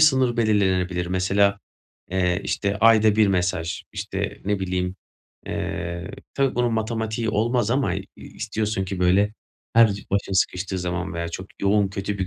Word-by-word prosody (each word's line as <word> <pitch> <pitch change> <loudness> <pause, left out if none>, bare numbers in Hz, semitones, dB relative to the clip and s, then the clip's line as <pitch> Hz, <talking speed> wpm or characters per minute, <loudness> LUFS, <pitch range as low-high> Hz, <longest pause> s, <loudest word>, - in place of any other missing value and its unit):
sınır 130 -5 +4
belirlenebilir. 95 -5 +1
Mesela, 100 +2 +2 0.5
eee, 90 0 +1
işte 100 -1 -1
ayda 110 -1 +5
bir 110 -1 +5
mesaj, 90 -3 -1
işte, - - -4
ne 100 +1 0
bileyim, 90 0 -2 0.5
eee, 85 +2 -4 0.2
tabii, 135 -1 +1
bunun 120 -1 +1
matematiği 110 0 -1
olmaz 115 +1 +1
ama 130 -7 +1
i 95 0 -4
istiyorsun 110 -3 -3
ki 95 0 -5
böyle 95 +4 +3 0.4
her 115 -2 +7
c 100 - -7
başın 100 0 0
sıkıştığı 95 0 0
zaman 90 +1 -3
veya 85 0 -3
çok 95 +3 -6 0.2
yoğun 100 0 +3
kötü 100 +1 -4
bir 95 - -1
100 Hz, 150 wpm, -24 LUFS, 90-110 Hz, 0.5 s, her